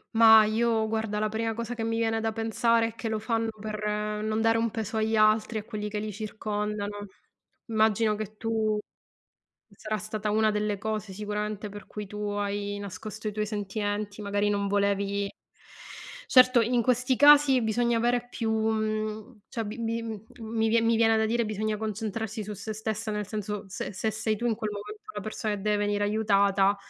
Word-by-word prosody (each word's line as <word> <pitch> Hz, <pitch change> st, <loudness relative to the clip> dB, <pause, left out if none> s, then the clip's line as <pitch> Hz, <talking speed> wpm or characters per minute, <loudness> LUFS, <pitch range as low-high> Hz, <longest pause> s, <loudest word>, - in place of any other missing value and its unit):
Ma 220 Hz, -1 st, +9 dB
io 220 Hz, +1 st, +1 dB
guarda, 220 Hz, -1 st, -2 dB
la 215 Hz, 0 st, +1 dB
prima 225 Hz, +1 st, -2 dB
cosa 235 Hz, +1 st, -4 dB
che 230 Hz, -2 st, -4 dB
mi 225 Hz, 0 st, -1 dB
viene 225 Hz, -1 st, +1 dB
da 225 Hz, 0 st, 0 dB
pensare 225 Hz, +1 st, +2 dB
è -, -, -11 dB
che 230 Hz, 0 st, -4 dB
lo 220 Hz, -, 0 dB
fanno 225 Hz, +1 st, -1 dB
per 215 Hz, 0 st, -5 dB, 0.4 s
non 215 Hz, +1 st, 0 dB
dare 225 Hz, 0 st, +3 dB
un 230 Hz, 0 st, +1 dB
peso 225 Hz, 0 st, -4 dB
agli 220 Hz, 0 st, +1 dB
altri, 215 Hz, +1 st, +3 dB
a 210 Hz, -, -3 dB
quelli 210 Hz, -1 st, -5 dB
che 210 Hz, -, -4 dB
li 210 Hz, 0 st, -3 dB
circondano. 210 Hz, -1 st, -4 dB, 0.6 s
Immagino 220 Hz, -1 st, +2 dB
che 215 Hz, 0 st, -6 dB
tu 220 Hz, -1 st, 0 dB, 0.9 s
sarà 215 Hz, +1 st, -4 dB
stata 215 Hz, 0 st, -3 dB
1 220 Hz, +1 st, +3 dB
delle 210 Hz, -1 st, -1 dB
cose, 215 Hz, -1 st, -3 dB
sicuramente, 210 Hz, +1 st, -3 dB
per 205 Hz, +1 st, -10 dB
cui 210 Hz, -1 st, -7 dB
tu 210 Hz, -, -8 dB
hai 205 Hz, 0 st, -2 dB
nascosto 205 Hz, +2 st, -6 dB
i -, -, -1 dB
tuoi 215 Hz, 0 st, -1 dB
sentimenti, 205 Hz, 0 st, -3 dB
magari 205 Hz, 0 st, +1 dB
non 200 Hz, -1 st, 0 dB
volevi 200 Hz, 0 st, 0 dB, 1.0 s
certo, 255 Hz, -1 st, +6 dB
in 240 Hz, +1 st, +2 dB
questi 250 Hz, +1 st, +2 dB
casi 285 Hz, -2 st, +7 dB
bisogna 235 Hz, +1 st, +1 dB
avere 240 Hz, +1 st, +1 dB
più 225 Hz, -2 st, -2 dB
mhmm, 215 Hz, +1 st, -1 dB
cioè 230 Hz, -3 st, -3 dB
bi 210 Hz, +3 st, -6 dB
bi 230 Hz, 0 st, -1 dB
mhmm, 220 Hz, -3 st, -5 dB, 0.2 s
mi 225 Hz, 0 st, -1 dB
vie 230 Hz, +1 st, +4 dB
mi 230 Hz, 0 st, +3 dB
viene 225 Hz, 0 st, +4 dB
da 220 Hz, -, +2 dB
dire: 235 Hz, +1 st, +1 dB
bisogna 215 Hz, 0 st, -2 dB
concentrarsi 220 Hz, +1 st, -3 dB
su 210 Hz, +1 st, -6 dB
se 215 Hz, +2 st, -5 dB
stessa, 220 Hz, 0 st, -3 dB
nel 210 Hz, -1 st, -3 dB
senso, 210 Hz, -1 st, -4 dB
se 195 Hz, +2 st, -5 dB
se 220 Hz, +4 st, -1 dB
sei 220 Hz, +1 st, -1 dB
tu 235 Hz, +3 st, -4 dB
in 225 Hz, -, +1 dB
quel 215 Hz, -1 st, -3 dB
momento 420 Hz, -, -8 dB
una -, -, -4 dB
persona 215 Hz, 0 st, -2 dB
e -, -, -3 dB
deve 210 Hz, +1 st, 0 dB
venire 205 Hz, 0 st, 0 dB
aiutata, 200 Hz, -2 st, +3 dB
215 Hz, 190 wpm, -28 LUFS, 210-225 Hz, 1.0 s, Ma